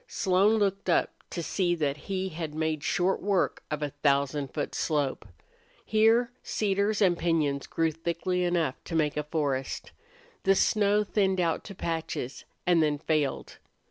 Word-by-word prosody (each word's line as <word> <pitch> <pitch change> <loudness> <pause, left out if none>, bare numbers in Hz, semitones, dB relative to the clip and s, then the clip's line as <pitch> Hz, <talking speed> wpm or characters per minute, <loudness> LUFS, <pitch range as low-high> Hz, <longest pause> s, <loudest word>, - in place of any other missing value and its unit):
Slone 195 +2 +3
looked 200 -2 0
up 170 - +3 0.2
to 170 - -4
see 175 0 0
that 145 -4 0
he 190 -1 -1
had 160 -2 -5
made 155 -1 -1
short 180 +2 +1
work 195 -2 +1
of 150 0 -2
a 145 - -2
thousand 140 -1 0
foot 145 - -3
slope. 145 -7 -1 0.6
Here 225 +2 +3
cedars 205 +1 0
and 180 -3 +4
piñons 155 -5 0
grew 165 -1 +1
thickly 170 +3 -2
enough 170 -6 0
to 165 - -5
make 150 -2 +1
a 150 - 0
forest. 145 -4 -2 0.5
The 195 0 +4
snow 210 +1 +3
thinned 195 -2 +1
out 170 -2 0
to 200 - -8
patches, 160 -7 -4 0.2
and 175 -2 +4
then 150 -2 +2
failed. 150 -2 -1
170 Hz, 155 wpm, -28 LUFS, 150-195 Hz, 0.6 s, and